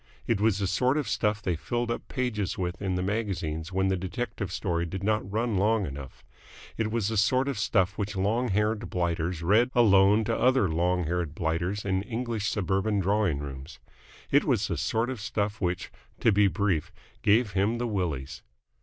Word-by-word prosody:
It 110 Hz, -3 st, 0 dB
was 110 Hz, -2 st, +3 dB
the 100 Hz, -, -1 dB
sort 125 Hz, +8 st, +1 dB
of 150 Hz, -, -1 dB
stuff 105 Hz, -1 st, 0 dB
they 90 Hz, -4 st, 0 dB
filled 120 Hz, +9 st, -2 dB
up -, -, -4 dB
pages 120 Hz, -7 st, -2 dB
with 90 Hz, -1 st, -3 dB
in 95 Hz, -2 st, -1 dB
the 90 Hz, -, -1 dB
magazines 95 Hz, -6 st, -2 dB
when 95 Hz, 0 st, +1 dB
the 95 Hz, -, +2 dB
detective 100 Hz, +1 st, -4 dB
story 85 Hz, -3 st, -1 dB
did 95 Hz, +3 st, -5 dB
not 105 Hz, -2 st, 0 dB
run 110 Hz, 0 st, 0 dB
long 105 Hz, +1 st, +2 dB
enough. 70 Hz, -3 st, -9 dB, 0.5 s
It 110 Hz, -1 st, -1 dB
was 110 Hz, -2 st, 0 dB
the 110 Hz, -, -2 dB
sort 130 Hz, +6 st, +3 dB
of 135 Hz, -6 st, -2 dB
stuff 100 Hz, -2 st, +1 dB
which 105 Hz, 0 st, -2 dB
long 110 Hz, +6 st, +1 dB
haired 105 Hz, +2 st, 0 dB
blighters 85 Hz, -1 st, -1 dB
read 110 Hz, +8 st, +4 dB
alone 105 Hz, -2 st, +5 dB
to 115 Hz, +1 st, 0 dB
other 125 Hz, -5 st, +3 dB
long 90 Hz, +2 st, +1 dB
haired 85 Hz, -2 st, -2 dB
blighters 85 Hz, +5 st, -1 dB
in 95 Hz, -1 st, +1 dB
English 115 Hz, -1 st, -2 dB
suburban 100 Hz, +1 st, 0 dB
drawing 100 Hz, -4 st, +1 dB
rooms. 70 Hz, +1 st, -8 dB, 0.5 s
It -, -, +5 dB
was -, -, +1 dB
the -, -, -1 dB
sort 115 Hz, +3 st, 0 dB
of 125 Hz, -5 st, -6 dB
stuff 105 Hz, -1 st, -2 dB
which 90 Hz, 0 st, -2 dB, 0.3 s
to 115 Hz, -, +4 dB
be 100 Hz, 0 st, +4 dB
brief 95 Hz, -6 st, 0 dB, 0.3 s
gave 105 Hz, +1 st, +3 dB
him 100 Hz, +4 st, +1 dB
the 120 Hz, -, -2 dB
Willies. 75 Hz, -, -3 dB
100 Hz, 190 wpm, -27 LUFS, 90-110 Hz, 0.5 s, alone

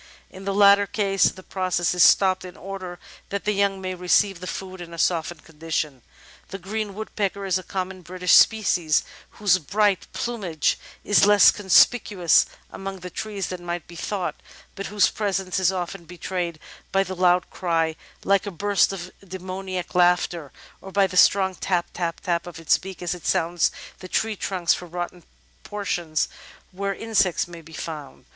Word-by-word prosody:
In 190 Hz, +1 st, -11 dB
the 195 Hz, -, -1 dB
latter 200 Hz, 0 st, +6 dB
case, 195 Hz, -2 st, +1 dB
the 185 Hz, -, -1 dB
process 180 Hz, -3 st, -1 dB
is 180 Hz, -, +1 dB
stopped 185 Hz, +2 st, +5 dB
in 180 Hz, 0 st, -10 dB
order 185 Hz, -2 st, -7 dB, 0.3 s
that 200 Hz, 0 st, -4 dB
the 210 Hz, -, +2 dB
young 200 Hz, -1 st, +1 dB
may 185 Hz, -1 st, -4 dB
receive 180 Hz, +1 st, +2 dB
the 180 Hz, -, -7 dB
food 185 Hz, -1 st, -6 dB
in 170 Hz, -1 st, -8 dB
a -, -, -11 dB
softened 165 Hz, -1 st, 0 dB
condition. 155 Hz, -4 st, -4 dB, 0.5 s
The 195 Hz, -, -5 dB
Green 200 Hz, +2 st, -4 dB
Woodpecker 200 Hz, -2 st, -3 dB
is 190 Hz, -1 st, +1 dB
a -, -, -7 dB
common 185 Hz, 0 st, -4 dB
British 180 Hz, +1 st, -2 dB
species, 180 Hz, -8 st, +4 dB, 0.3 s
whose 195 Hz, -3 st, +3 dB
bright 200 Hz, +4 st, +1 dB
plumage 195 Hz, -10 st, -1 dB, 0.2 s
is 205 Hz, -1 st, +4 dB
less 205 Hz, -2 st, +7 dB
conspicuous 195 Hz, -3 st, +4 dB, 0.2 s
among 195 Hz, -1 st, -7 dB
the 180 Hz, 0 st, -7 dB
trees 205 Hz, 0 st, -4 dB
than 180 Hz, -1 st, -6 dB
might 175 Hz, -1 st, -4 dB
be 170 Hz, -, -12 dB
thought, 185 Hz, +2 st, -3 dB, 0.4 s
but 200 Hz, -, -6 dB
whose 205 Hz, -2 st, +3 dB
presence 195 Hz, -3 st, -1 dB
is 190 Hz, -1 st, +3 dB
often 180 Hz, -1 st, -5 dB
betrayed 175 Hz, -1 st, -4 dB, 0.3 s
by 195 Hz, +1 st, +3 dB
the 185 Hz, 0 st, -6 dB
loud 180 Hz, -1 st, +2 dB
cry 165 Hz, -3 st, 0 dB
— -, -, -28 dB
^like 200 Hz, +1 st, +2 dB
a -, -, -1 dB
burst 200 Hz, +2 st, +2 dB
of 180 Hz, -2 st, -7 dB
demoniac 185 Hz, 0 st, -6 dB
laughter 175 Hz, -4 st, +2 dB, 0.2 s
— -, -, -26 dB
or 195 Hz, -, -10 dB
by 195 Hz, 0 st, +3 dB
the 185 Hz, -1 st, -5 dB
strong 190 Hz, 0 st, +5 dB
"tap, 180 Hz, -1 st, -1 dB
tap, 170 Hz, -2 st, -3 dB
tap" 170 Hz, -1 st, -1 dB
of 175 Hz, -, -9 dB
its 165 Hz, -, +3 dB
beak 190 Hz, -1 st, -9 dB
as 175 Hz, -, -1 dB
it 180 Hz, -, -7 dB
sounds 170 Hz, +1 st, +2 dB, 0.3 s
the 185 Hz, -, -9 dB
tree 220 Hz, +3 st, 0 dB
trunks 185 Hz, -3 st, 0 dB
for 180 Hz, -, -6 dB
rotten 175 Hz, 0 st, -6 dB, 0.4 s
por 205 Hz, -1 st, -6 dB
tions 160 Hz, -5 st, 0 dB, 0.4 s
where 195 Hz, +1 st, -3 dB
insects 200 Hz, -7 st, +1 dB
may 170 Hz, -1 st, -10 dB
be 165 Hz, -, -16 dB
found. 155 Hz, -3 st, -7 dB
185 Hz, 180 wpm, -24 LUFS, 175-195 Hz, 0.5 s, less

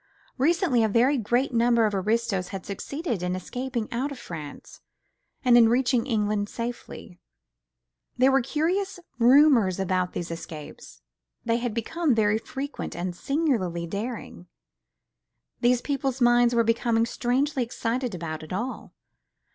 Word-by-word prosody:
Recently 310 Hz, -, +3 dB
a 220 Hz, -, +2 dB
very 245 Hz, +7 st, +3 dB
great 245 Hz, +4 st, 0 dB
number 235 Hz, -1 st, +3 dB
of 210 Hz, -, 0 dB
aristos 200 Hz, -1 st, 0 dB
had 195 Hz, 0 st, -7 dB
succeeded 240 Hz, -, -4 dB
in 180 Hz, 0 st, -1 dB
escaping 245 Hz, +4 st, -4 dB
out 265 Hz, +5 st, -2 dB
of 280 Hz, -, -7 dB
France 155 Hz, -9 st, -9 dB, 0.6 s
and 245 Hz, -1 st, +6 dB
in 230 Hz, -2 st, +7 dB
reaching 245 Hz, 0 st, +2 dB
England 210 Hz, -3 st, 0 dB
safely. 230 Hz, -6 st, -7 dB, 1.0 s
There 260 Hz, +2 st, +5 dB
were 270 Hz, 0 st, +4 dB
curious 355 Hz, +8 st, -1 dB, 0.2 s
rumours 240 Hz, -6 st, +5 dB
about 185 Hz, -1 st, 0 dB
these 170 Hz, -1 st, -4 dB
escapes; 155 Hz, -, -9 dB, 0.4 s
they 230 Hz, 0 st, +2 dB
had 240 Hz, -2 st, -3 dB
become 295 Hz, +4 st, 0 dB
very 215 Hz, 0 st, +2 dB
frequent 280 Hz, +5 st, -6 dB
and 175 Hz, 0 st, -4 dB
singularly 220 Hz, -, -1 dB
daring; 205 Hz, -1 st, -6 dB, 1.1 s
the 245 Hz, 0 st, +3 dB
people's 270 Hz, -2 st, -2 dB
minds 240 Hz, -1 st, +4 dB
were 230 Hz, -, +4 dB
becoming 230 Hz, 0 st, +1 dB
strangely 260 Hz, +4 st, 0 dB
excited 235 Hz, -1 st, -2 dB
about 160 Hz, -2 st, -5 dB
it 155 Hz, -, -11 dB
all. 235 Hz, +8 st, -5 dB
235 Hz, 135 wpm, -26 LUFS, 200-260 Hz, 1.1 s, in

